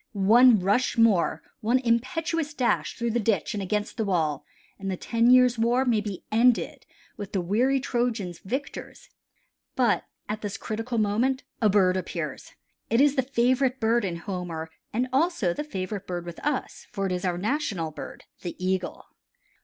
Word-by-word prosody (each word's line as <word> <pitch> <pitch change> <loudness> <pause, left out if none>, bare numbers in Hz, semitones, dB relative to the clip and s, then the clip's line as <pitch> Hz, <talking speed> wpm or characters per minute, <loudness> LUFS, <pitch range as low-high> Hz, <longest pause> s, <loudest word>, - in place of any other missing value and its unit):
One 225 +4 +6
rush 205 +7 +1
more, 220 -7 +3 0.2
one 235 +4 +2
impetuous 295 +6 -1
dash 250 -4 0
through 235 -1 -1
the 240 - +1
ditch 210 -2 0
and 205 - -3
against 210 +4 -2
the 225 - 0
wall, 160 -8 0 0.4
and 195 0 -4
the 185 - -2
ten 230 +4 +1
years' 250 -2 +5
war 240 +3 +2
may 230 -4 +2
be 205 -3 -6
ended 235 +2 +2 0.3
with 205 -1 -7
the 195 - +1
weary 235 +10 +2
Trojans 235 -9 -2
victors. 280 - -6 0.7
But 240 -5 +2 0.2
at 210 +1 -4
this 205 -2 -4
critical 225 +2 -4
moment 225 +5 +1 0.2
a 215 - +4
bird 190 -2 +3
appears, 185 - -5 0.4
it 230 - +3
is 285 0 +4
the 265 - +3
favorite 255 0 +1
bird 230 +1 +2
in 180 -4 -2
Homer 170 -3 -5 0.2
and 245 +4 0
also 275 - +2
the 295 - -4
favorite 200 -6 -5
bird 175 -1 -4
with 170 -1 -8
us, 295 -2 -3
for 195 -4 -2
it 190 - -1
is 180 0 -2
our 180 -2 0
national 200 - -1
bird, - - -9 0.2
the 175 - -5
Eagle. 185 0 -2
220 Hz, 170 wpm, -26 LUFS, 190-250 Hz, 0.7 s, One